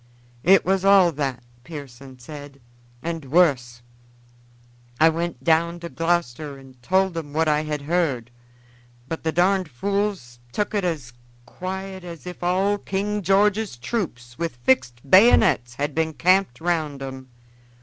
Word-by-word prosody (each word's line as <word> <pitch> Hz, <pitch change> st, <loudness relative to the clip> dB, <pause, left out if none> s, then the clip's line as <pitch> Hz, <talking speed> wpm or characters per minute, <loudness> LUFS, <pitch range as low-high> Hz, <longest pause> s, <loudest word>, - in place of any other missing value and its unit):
"It 190 Hz, +7 st, +5 dB
was 190 Hz, +1 st, +1 dB
all 195 Hz, -3 st, +6 dB
that," 135 Hz, -5 st, -3 dB, 0.2 s
Pearson 135 Hz, -4 st, -10 dB
said, 145 Hz, +2 st, -11 dB, 0.4 s
"and 165 Hz, -1 st, -4 dB
wuss. 130 Hz, -6 st, +2 dB, 1.2 s
I 160 Hz, -, +7 dB
went 165 Hz, -5 st, -3 dB
down 170 Hz, +3 st, +2 dB
to 170 Hz, -, -6 dB
Gloucester 160 Hz, -4 st, -1 dB
and 130 Hz, -2 st, -16 dB
told 190 Hz, +5 st, +1 dB
'em 150 Hz, -3 st, -6 dB
what 160 Hz, +1 st, +1 dB
I 150 Hz, 0 st, +2 dB
had 150 Hz, -2 st, -4 dB
heard, 140 Hz, -7 st, -1 dB, 0.8 s
but 165 Hz, -, -4 dB
the 160 Hz, -, 0 dB
darned 185 Hz, +1 st, +2 dB
fools 195 Hz, -4 st, -2 dB
tuk 210 Hz, -, -2 dB
it 205 Hz, -2 st, 0 dB
as 150 Hz, -9 st, -3 dB, 0.3 s
quiet 190 Hz, +5 st, -6 dB
as 170 Hz, -2 st, -9 dB
if 180 Hz, 0 st, -8 dB
all 190 Hz, +3 st, +1 dB
King 205 Hz, +2 st, -2 dB
George's 200 Hz, -, +2 dB
troops 120 Hz, -, -4 dB
with 165 Hz, -6 st, -2 dB
fixed 130 Hz, 0 st, +1 dB
bayonets 135 Hz, -, +5 dB
had 145 Hz, +2 st, -2 dB
been 160 Hz, +1 st, 0 dB
camped 185 Hz, -6 st, +2 dB
round 155 Hz, -5 st, -1 dB
'em. 130 Hz, -1 st, -8 dB
160 Hz, 140 wpm, -23 LUFS, 135-185 Hz, 1.2 s, I